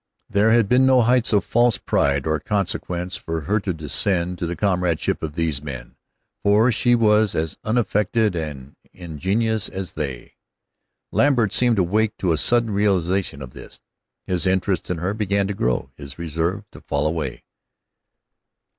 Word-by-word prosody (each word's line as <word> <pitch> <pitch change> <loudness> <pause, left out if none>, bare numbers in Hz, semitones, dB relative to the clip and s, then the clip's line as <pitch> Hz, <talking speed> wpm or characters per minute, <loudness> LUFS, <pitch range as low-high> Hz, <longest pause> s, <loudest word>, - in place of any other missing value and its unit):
There 105 +2 +3
had 115 -2 +4
been 125 +3 +4
no 130 -2 +5
heights 125 0 +2
of 105 -2 +2
false 120 -1 +3
pride 70 -1 0
or 80 0 0
consequence 90 -3 -2
for 80 0 -4
her 105 +8 0
to 100 -2 -3
descend 85 +3 0
to 85 - -2
the 85 - -3
comradeship 90 -3 0
of 80 -2 -4
these 80 -4 -1
men, 70 -4 -8 0.5
for 105 +5 +4
she 120 +2 +3
was 110 -2 +3
as 80 -1 -2
unaffected 110 -2 0
and 75 -4 -6 0.2
ingenuous 95 +6 -1
as 95 -1 -5
they. 70 -6 -6 0.7
Lambert 125 -7 +2
seemed 120 -2 +3
to 95 - +2
wake 110 +4 0
to 90 - 0
a 80 - +1
sudden 115 - +3
realization 95 -6 0
of 65 - -10
this. - - -12 0.5
His 90 0 0
interest 95 0 0
in 90 - -1
her 90 +5 -2
began 100 -2 0
to 100 - -3
grow, 60 -9 -1
his 70 -2 -10
reserve 85 +5 -3
to - - -13
fall - - -2
away. 75 -5 -3
95 Hz, 165 wpm, -22 LUFS, 80-110 Hz, 0.7 s, no